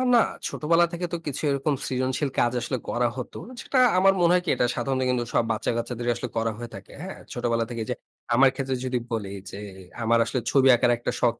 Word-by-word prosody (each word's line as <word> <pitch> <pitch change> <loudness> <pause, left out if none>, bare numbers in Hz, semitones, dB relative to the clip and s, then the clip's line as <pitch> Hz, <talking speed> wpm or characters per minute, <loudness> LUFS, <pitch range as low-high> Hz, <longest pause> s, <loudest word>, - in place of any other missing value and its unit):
না, - - +7 0.3
ছোটবেলা 165 +3 +3
থেকে 175 +1 -2
তো 170 - +1
কিছু 145 - -3
এরকম 140 +2 0
সৃজনশীল 130 +2 -1
কাজ 120 - +3
আসলে 130 - -2
করা 120 0 +1
হত। 125 - -5 0.3
যেটা 260 - 0 0.2
আমার 195 +1 +6
মনে 170 0 +5
হয় 180 - +4
কি, - - -1
এটা 125 - +2
সাধারণত 135 -1 -1
কিন্তু 125 -1 +1
সব - - +3
বাচ্চা-গাচ্চাদেরই 120 +2 -1
আসলে 120 0 -5
করা 115 0 +1
হয়ে 120 0 -7
থাকে, - - -11
হ্যাঁ? - - -7 0.2
ছোটবেলা 115 -1 0
থেকে 115 -2 -3
যে - - +1 0.4
আমার 135 +2 +7
ক্ষেত্রে 135 0 -2
যদি 125 -1 0
বলি, 105 -4 -3 0.2
যে 100 - -8 0.4
আমার 115 +1 +4
আসলে 125 - -1
ছবি 135 -1 +5
আঁকার 120 0 +3
একটা 120 - -2
শখ 120 -1 +3
125 Hz, 210 wpm, -25 LUFS, 120-135 Hz, 0.4 s, না